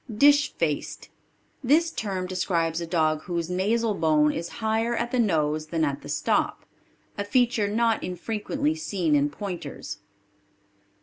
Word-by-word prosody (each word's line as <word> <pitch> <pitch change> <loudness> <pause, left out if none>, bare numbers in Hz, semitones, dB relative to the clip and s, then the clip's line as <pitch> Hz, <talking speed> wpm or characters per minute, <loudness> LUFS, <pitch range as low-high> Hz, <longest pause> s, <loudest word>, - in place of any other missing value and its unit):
Dish 285 +6 +5
faced. - - -3 0.5
This 320 +6 +3
term 195 -8 -3
describes 170 -3 -1
a 170 - -4
dog 155 -2 +1
whose 170 -2 -3
nasal 215 +5 +1
bone 155 -4 +3
is 170 +1 -4
higher 225 +1 0
at 235 +1 -2
the 255 - 0
nose 155 -7 +1
than 160 0 0
at 140 -1 -3
the - - -10
stop - - 0 0.5
a - - +1
feature 235 0 +2
not 225 +2 +1
infrequently 225 - -2
seen 190 - 0
in 145 0 +3
pointers. 180 +4 -6
190 Hz, 140 wpm, -26 LUFS, 165-230 Hz, 0.5 s, Dish